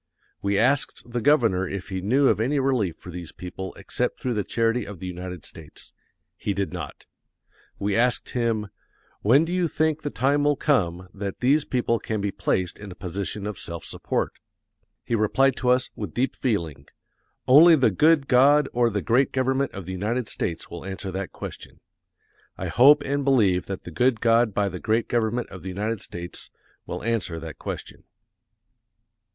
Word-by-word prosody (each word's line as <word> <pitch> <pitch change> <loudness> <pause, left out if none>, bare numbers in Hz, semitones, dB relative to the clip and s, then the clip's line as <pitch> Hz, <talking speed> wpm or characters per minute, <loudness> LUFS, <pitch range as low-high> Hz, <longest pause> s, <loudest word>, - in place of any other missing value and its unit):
We 100 0 +1
asked 135 +6 +1
the 120 0 -3
governor 115 -10 +3
if 100 0 -6
he 95 -1 -3
knew 130 +8 +3
of - - +3
any 130 +6 +1
relief 125 - +1
for 90 - -10
these 85 -2 -7
people 95 +1 -7
except - - -2
through 125 - -2
the 105 -2 -1
charity 115 +2 0
of 105 -1 -8
the 95 - -8
United 90 -2 -6
States. 80 -1 -12 0.4
He 100 - -2
did 100 -2 -2
not. 80 -5 -7 0.7
We 100 0 -1
asked 125 +1 +1
him, 115 -4 -1 0.5
"When 135 +9 +5
do 170 - -4
you 180 -2 +1
think 155 0 0
the 145 - -3
time 140 +3 +1
will 145 0 +3
come 90 - 0
that 100 -1 -5
these 140 +4 +3
people 120 -2 0
can 110 -1 -3
be 100 0 -1
placed 90 -2 -1
in 105 -2 -8
a - - -9
position 100 +3 -4
of 105 -3 -5
self 85 -1 -7
support?" - - -2 0.7
He - - -4
replied 120 +5 +3
to 125 - 0
us, 125 0 +2
with 105 -7 -6
deep 130 +2 0
feeling, 85 - -2 0.6
"Only 160 +6 +8
the 130 -7 +3
good 150 - +4
God 140 +3 +5
or 120 -1 +3
the 100 -3 -2
great 125 +4 +3
government 130 +1 +1
of 95 -3 -8
the 95 - -6
United 105 +6 -2
States 85 -2 -3
will 85 - -7
answer 95 0 -5
that 95 +1 -4
question." - - -9 0.8
I - - -4
hope 145 +4 +6
and 140 +1 -1
believe 105 -10 +3
that 95 -2 -5
the 90 - -8
good 120 +7 +2
God 115 0 +3
by 100 0 0
the 90 -2 -5
great 110 +3 0
government 120 +1 0
of 90 - -10
the 95 - -6
United 105 +3 -2
States 85 0 -7 0.4
will 90 - -5
answer 105 -8 -1
that 80 -1 -9
question. - - -7
110 Hz, 185 wpm, -25 LUFS, 95-130 Hz, 0.8 s, Only